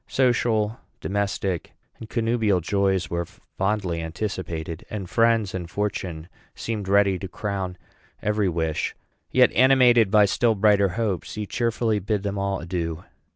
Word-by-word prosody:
Social, 120 -4 +1 0.2
domestic, 100 -3 -2 0.3
and 110 - -9
connubial 115 -4 +1
joys 95 +1 0
were 85 -1 -2 0.3
fondly 95 -4 0
anticipated, 80 -2 -4
and 100 -4 -5
friends 115 +1 +2
and 90 -2 -5
fortune 90 -5 -3 0.3
seemed 105 -4 -4
ready 100 -1 +3
to 95 - -5
crown 95 -1 -4 0.4
every 105 -2 +1
wish; 80 -2 -1 0.3
yet, - - +5
animated 125 -3 +5
by 105 0 +6
still 115 +3 +2
brighter 100 -1 +4
hopes, 105 -7 -2
he 105 -1 -3
cheerfully 115 0 0
bade 100 +1 -2
them 100 -1 -2
all 100 -1 -1
adieu. 85 -1 -3
100 Hz, 135 wpm, -24 LUFS, 90-110 Hz, 0.4 s, by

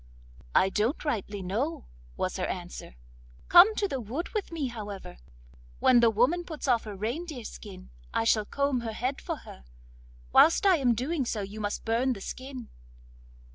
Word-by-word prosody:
'I 190 - +5
don't 220 - -1
rightly 205 -7 -2
know,' 180 - -2 0.3
was - - -2
her - - -1
answer. - - -6 0.5
'Come 385 +5 +8
to 405 - +1
the 270 -7 -3
wood 255 - -4
with 425 -5 -3
me, 320 -4 -2
however; 205 - -8 0.6
when 250 -2 +5
the 235 -1 +5
woman 250 +11 +2
puts 315 -4 -6
off 240 -3 +2
her 210 -2 -6
reindeer 250 - -4
skin 60 - -10 0.2
I - - 0
shall 220 -2 +3
comb 280 +2 0
her 230 -2 -4
head 255 +5 -2
for 335 - -3
her; 65 - -12 0.7
whilst 330 - +6
I 380 -3 +6
am 250 -5 +2
doing 275 +6 -1
so 225 -3 -2
you 200 +2 -7
must 205 0 -3
burn 240 +3 +1
the 210 - -8
skin. 255 +1 -7
240 Hz, 175 wpm, -28 LUFS, 210-290 Hz, 0.7 s, Come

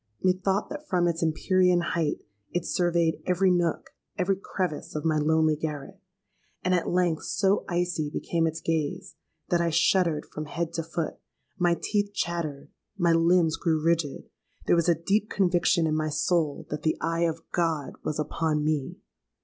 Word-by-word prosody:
Methought 190 +2 +1
that 300 0 -7
from 175 -2 +2
its 170 -1 -1
empyrean 180 +2 +3
height 165 -3 -1 0.3
it 175 0 -2
surveyed 170 -2 +1
every 185 +1 +3
nook, 175 -2 0 0.3
every 195 0 +1
crevice 185 -6 -4
of 150 - -3
my 155 -1 +2
lonely 155 0 +3
garret; 150 +4 -5 0.6
and 185 - +2
at 180 - +1
length 175 -3 +1
so 200 0 +1
icy 175 -4 -1
became 165 +2 0
its 160 0 -4
gaze, 160 -3 -2 0.3
that 175 -1 +2
I 170 - +1
shuddered 165 -1 +2
from 155 - -7
head 165 +3 -3
to 165 - -1
foot—my 170 +1 -3
teeth 205 -1 0
chattered—my 170 +2 -2
limbs 165 -1 +3
grew 165 -2 +1
rigid. 165 -2 0 0.4
There - - +4
was 170 0 +2
a 170 - +5
deep 200 +6 0
conviction 175 -2 +2
in 155 - +1
my 155 0 0
soul 155 0 0
that 150 0 -3
the 155 +1 0
eye 165 +1 0
of 165 0 -4
God 165 -4 -1
was 150 - -2
upon 150 0 -1
me! 150 -3 -1
170 Hz, 160 wpm, -27 LUFS, 155-180 Hz, 0.6 s, a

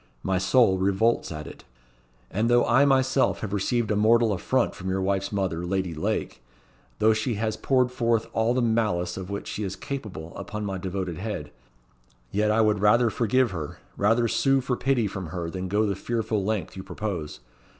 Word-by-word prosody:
My 95 -1 +1
soul 95 0 +4
revolts 100 +4 +1
at 75 -1 -6
it. - - -11 0.7
And 110 +5 0
though 120 0 +4
I 140 - +4
myself 135 -1 +2
have 105 -2 -4
received 110 +3 0
a - - +2
mortal 110 +1 +4
affront 125 +7 0
from 95 -2 -6
your 95 +1 0
wife's 95 0 -1
mother, 95 -4 -1
Lady 95 -1 -1
Lake; 75 -4 -3 0.6
though 110 +1 +4
she 110 +2 -1
has 110 +1 -1
poured 130 -2 +1
forth 115 -2 +1
all 115 +2 +1
the 130 - +2
malice 105 -7 0
of 95 -1 -6
which 100 0 -5
she - - -4
is 95 -2 -3
capable 105 - -6
upon 105 0 -5
my 95 -2 -3
devoted 90 -2 -4
head; 95 -8 -5 0.8
yet 105 +1 +1
I 110 +1 +3
would 105 -2 +2
rather 110 +3 +4
forgive 125 +1 +2
her 80 -5 -5 0.2
rather 115 +4 +2
sue 135 +4 +2
for 125 -1 -1
pity 125 -2 +1
from 95 -3 -4
her 85 0 -4
than 95 +1 -4
go 105 +3 +1
the 100 -2 -1
fearful 110 -1 -2
length 105 -1 -2
you 95 - -6
propose. 90 -9 -5
105 Hz, 190 wpm, -26 LUFS, 95-115 Hz, 0.8 s, soul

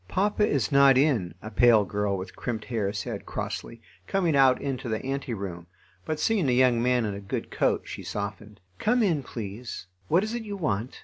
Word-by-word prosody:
"Papa 210 - +1
is 135 -8 0
not 140 -1 +6
in," 130 - +2
a 110 - -7
pale 115 -4 +5
girl 100 0 -1
with 95 +1 -7
crimped 115 -3 -4
hair 110 -5 -1
said, - - -5
crossly, 115 -1 -5 0.2
coming 180 -6 +1
out 135 -2 +5
into 135 -3 -3
the 110 +3 -3
ante 135 -1 -3
room, 90 -4 -6 0.4
but, 155 -1 -2
seeing 200 -9 +2
a - - +3
young 125 -1 +4
man 125 -1 +2
in 105 - -2
a 100 - -6
good 95 - -4
coat, - - +1
she - - -7
softened. 105 0 -6 0.2
"Come 240 +2 +2
in, 165 -8 +2
please.... 115 -3 -7 0.2
What 175 - +3
is 215 +1 -3
it 240 - -2
you 205 -2 -6
want?" 125 - -2
125 Hz, 200 wpm, -27 LUFS, 105-150 Hz, 0.4 s, not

